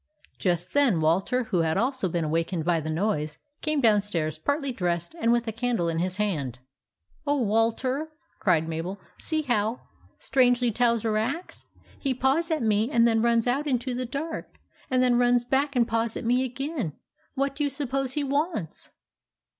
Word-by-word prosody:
Just 175 -2 0
then 275 - +3
Walter, 185 +11 +2
who 205 -6 -1
had 160 +1 +1
also 245 -3 0
been 170 0 -1
awakened 165 +1 -1
by 170 -1 +2
the 155 0 -4
noise, 155 -3 -1 0.2
came 305 -2 0
downstairs 200 - +1
partly 285 - -1
dressed 175 - -2
and 230 - +3
with 240 0 +1
a - - 0
candle 230 -6 0
in 165 0 -1
his 185 +2 -2
hand. 155 - -1 0.3
" 305 - -33
Oh, 290 0 +2
Walter! 230 +7 +1 0.2
" - - -41
cried 165 -5 +2
Mabel. 165 +5 -4
" - - -34
See 315 -1 0
how 230 -3 0 0.4
strangely 245 -2 +3
Towser 230 -2 +1
acts! 335 +11 -4 0.3
He 270 -3 -1
paws 270 +7 +1
at 315 -6 0
me 215 +1 +2
and 235 -5 +4
then 225 -1 +2
runs 235 -1 +3
out 270 +5 0
into 255 -2 0
the 250 0 -3
dark, 300 +6 -5 0.3
and 255 -1 +3
then 245 -1 +3
runs 245 0 +4
back 275 +3 +1
and 235 -2 +3
paws 230 0 -1
at - - -5
me 250 +2 +2
again. 260 - -3 0.4
What 275 0 0
do 295 - -1
you 285 - +1
suppose 270 -2 -2
he 295 - -1
wants 280 - -2
235 Hz, 185 wpm, -26 LUFS, 185-265 Hz, 0.4 s, and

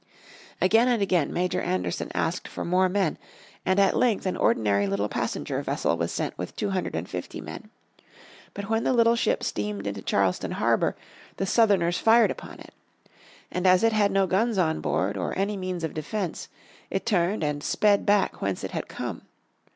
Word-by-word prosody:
Again 225 +6 +4
and 245 -2 +2
again 185 -6 +1
Major 180 +1 -1
Anderson 90 -1 -2
asked - - -1
for - - -6
more 185 +2 +3
men, 190 -4 0 0.5
and 185 +1 +3
at 195 - +4
length 235 -6 +2
an 185 - 0
ordinary 100 -2 +2
little 100 +1 0
passenger - - -3
vessel 85 - 0
was 85 0 -2
sent - - -3
with 90 - -5
two 205 -2 -2
hundred 185 - -2
and 80 +2 -3
fifty 90 -1 -6
men. - - -9 0.9
But 200 0 -5
when 225 +1 0
the - - +2
little 230 -1 +4
ship 235 - 0
steamed 105 -1 -3
into 100 -1 -4
Charleston 95 -2 0
harbour - - +1 0.4
the 195 - -1
Southerners 195 -5 +3
fired 230 +1 +5
upon - - -9
it. - - -13 0.8
And 180 +1 0
as 185 +1 +5
it 225 -1 +4
had 205 -2 +3
no 195 0 +3
guns 210 +4 +1
on 160 -4 +1
board 100 +3 -1
or 90 - -3
any 200 +2 0
means 185 -3 -4
of 160 - -3
defence 180 +3 -4 0.4
it 195 - -2
turned 190 -4 +1
and 145 -1 -2
sped 205 -1 +2
back 205 -1 +2
whence 100 -1 -2
it - - -4
had - - -4
come. - - -5
185 Hz, 185 wpm, -26 LUFS, -, 0.9 s, fired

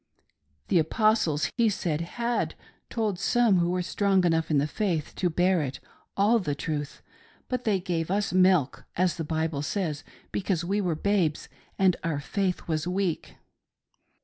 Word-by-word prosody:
The 175 - +4
Apostles, 170 -3 +2
he 230 -2 +4
said, 165 -6 -1
had 235 +7 -2 0.3
told 215 -6 -1
some 230 -3 +3
who 170 0 +1
were 180 0 0
strong 195 0 +2
enough 165 -1 +1
in 155 - +3
the 140 - +2
faith 165 -1 -2
to 180 - +1
bear 180 +1 +2
it, 135 -3 -4 0.4
all 215 +4 +4
the 150 -8 -2
truth, 145 -1 -4 0.4
but 250 -1 -3
they 205 -4 +2
gave 170 -3 -2
us 200 0 0
milk, 185 -7 +3
as 180 -2 +1
the 165 - -2
Bible 160 -1 -1
says, 155 -2 -2 0.3
because 185 -3 -1
we 200 +3 0
were 175 -4 0
babes 175 -3 0 0.3
and 190 -2 +3
our 160 -4 -1
faith 185 +5 -2
was 155 0 -1
weak. 180 -2 -2
180 Hz, 160 wpm, -27 LUFS, 160-200 Hz, 0.4 s, The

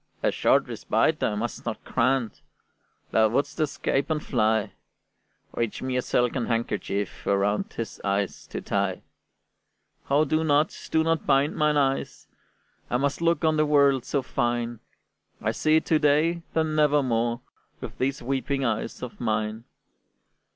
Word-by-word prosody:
"A - - +3
short - - +3
respite - - 0
I 105 - +1
must 115 +3 -4
not 110 -2 -5
grant; 130 -2 0 0.7
Thou 110 -1 +4
wouldst 145 +7 -1
escape 140 -1 0
and 155 -1 -1
fly: 110 -4 +1 0.8
Reach 115 0 -2
me 130 -1 -2
a 125 - +2
silken 125 0 0
handkerchief 105 -3 -2
Around 100 +1 +1
his 115 - -6
eyes 100 0 -2
to - - -5
tie." - - -1 1.1
"Oh, 145 +3 +4
do 155 +2 +1
not, 150 0 +2 0.2
do 160 0 +3
not 165 -1 0
bind 140 +2 +3
mine 150 -1 +2
eyes! 135 -1 -1 0.6
I 125 - +1
must 140 +4 -1
look 170 0 +2
on 155 -1 +3
the 155 - +3
world 140 -3 +4
so 140 0 -1
fine; 120 -1 -1 0.6
I - - 0
see 155 0 +2
it 160 - +2
to 155 - +3
day, 155 +4 +2
then 160 -1 +1
never 150 -1 +3
more, 120 -1 0 0.4
With - - -8
these 135 0 -1
weeping 135 +1 -1
eyes 110 +2 -2
of 125 - -7
mine." 110 0 -1
135 Hz, 150 wpm, -26 LUFS, 115-150 Hz, 1.1 s, Thou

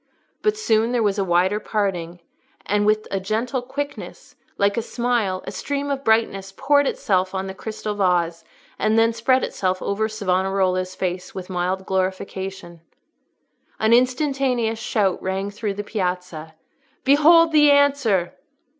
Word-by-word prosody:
But 425 0 +1
soon 225 - +1
there 240 -2 +1
was 205 -1 0
a - - +2
wider 185 +3 +2
parting, 180 -6 -3 0.4
and 205 +1 +1
with 215 0 +1
a 195 - 0
gentle 225 +6 -2
quickness, 285 +3 -7 0.2
like 200 0 +2
a 230 - 0
smile, 235 -5 -1
a - - -5
stream 285 0 -3
of 275 -1 -3
brightness 220 -4 +1
poured 285 0 +3
itself 185 -2 0
on 190 0 -2
the 190 - -6
crystal 215 +1 -5
vase, 175 -4 0 0.4
and 215 +1 +2
then 225 0 +4
spread 255 +3 +2
itself 185 -1 -1
over 220 +3 -1
Savonarola's 185 -2 0
face 180 -1 -4
with 185 0 -7
mild 185 +1 -2
glorification. 190 -2 -4 1.0
An 220 +1 +3
instantaneous 255 -2 +1
shout 205 -5 0
rang 190 +2 -3
through 205 -1 -4
the 205 - -4
Piazza, 180 -6 -4 0.5
"Behold 320 +4 +6
the 300 -1 +6
answer!" 275 -11 +3
205 Hz, 145 wpm, -22 LUFS, 185-245 Hz, 1.0 s, Behold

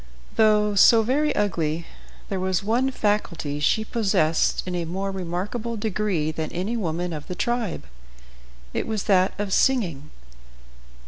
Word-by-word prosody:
Though 210 -1 +4
so 225 +3 +6
very 290 +6 +1
ugly, 165 -5 -1 0.4
there 195 - -2
was 185 0 0
one 240 +6 +1
faculty 195 - -1
she 220 +8 +2
possessed 195 -9 +1
in 180 - -4
a 175 -1 -2
more 190 +4 -3
remarkable 195 +6 -4
degree 205 -7 -1
than 155 0 -4
any 190 +7 -2
woman 175 -4 -2
of 150 -2 -7
the 180 - -5
tribe. 235 -3 -2 0.9
It - - -2
was 215 -3 -2
that 185 -1 +3
of 205 -2 -2
singing. 175 - +1
195 Hz, 140 wpm, -24 LUFS, 170-220 Hz, 0.9 s, so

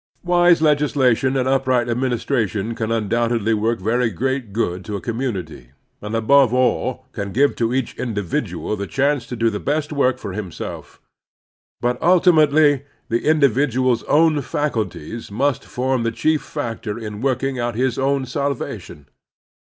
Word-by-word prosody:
Wise 175 -2 +4
legislation 135 -4 +2
and 130 -1 0
upright 130 -2 +1
administration 115 -3 -1
can 115 -1 -3
tmdoubtedly 115 0 0
work 110 +2 0
very 115 +5 +1
great 130 +2 -2
good 95 -4 -2
to 105 -2 -5
a - - -3
com 115 +2 -4
munity, 90 - -4 0.3
and, 105 +2 -4
above 125 +2 +4
all, 130 0 0
can 100 -4 -5
give 140 +7 +2
to 115 -1 0
each 130 -2 -2
indi 110 -5 -2
vidual 90 +4 -3
the 100 -1 -5
chance 135 -2 0
to 125 - -5
do 115 0 +1
the 105 - -4
best 150 +1 -2
work 130 -3 +2
for 100 -3 -6
himself. 95 -4 -7 0.8
But 125 +1 -1
tiltimately 155 -5 +4 0.3
the 115 +3 -1
individual's 130 -4 +2
own 155 0 +3
faculties 115 - -3
must 130 +5 -1
form 130 0 -1
the 115 - 0
chief 155 +6 +1
factor 115 -6 -5
in 105 -2 -7
working 135 0 -1
out 120 -1 -2
his 125 +1 0
own 135 0 +1
sal 140 +2 -1
vation. 75 -10 -8
125 Hz, 155 wpm, -20 LUFS, 110-140 Hz, 0.8 s, Wise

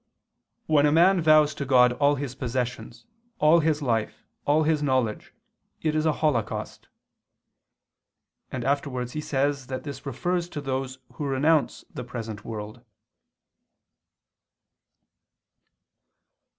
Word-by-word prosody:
"When 150 -2 +4
a - - +2
man 175 +3 +5
vows 155 -1 +5
to - - -4
God 125 -2 +5
all 145 +2 +2
his 140 -2 -4
possessions, 120 -2 -4 0.3
all 155 -1 +5
his 155 -2 0
life, 115 -4 -2 0.2
all 150 +2 +3
his 155 -1 +1
knowledge, 130 -6 -1 0.5
it 155 -1 +1
is 155 +1 +1
a - - +4
holocaust"; 130 -8 -2 1.6
and 125 -2 -4
afterwards 135 -3 -1
he 155 - -4
says 140 -2 -1
that 130 -1 -5
this 140 -3 -7
refers 175 +6 -2
to 150 - -5
those 130 -1 -3 0.2
who 150 - -5
renounce 145 +3 +1
the 125 - -5
present 115 -3 -7
world. 110 +1 -7
140 Hz, 120 wpm, -26 LUFS, 125-155 Hz, 1.6 s, man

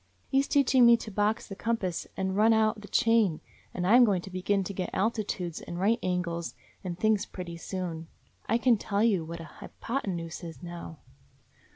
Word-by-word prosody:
He 270 - +3
's 275 - -4
teaching 265 -2 +4
me 235 0 +7
to 220 - -8
box 210 +2 0
the 195 - -7
compass 200 -5 -2
and 190 0 -1
run 220 +2 +5
out 215 -1 +2
the 205 - -10
chain, 225 -9 +3 0.3
and 180 - -3
I 200 - +4
'm 250 - +8
going 195 -6 +2
to 190 - -9
begin 190 +2 0
to 200 - -5
get 185 -1 -3
altitudes 195 -5 -2
and 175 - -6
right 220 +5 +2
angles 170 -6 -2 0.3
and 175 -2 -4
things 215 +1 +1
pretty 175 -2 -7
soon. 170 -2 -5 0.4
I 230 - +4
can 240 -1 +3
tell 205 0 0
you 200 -7 +2
what 170 +1 -7
a - - -7 0.2
hypotenuse 180 -10 -4
is 165 0 -9
now." 170 -2 -8
195 Hz, 195 wpm, -28 LUFS, 175-220 Hz, 0.4 s, m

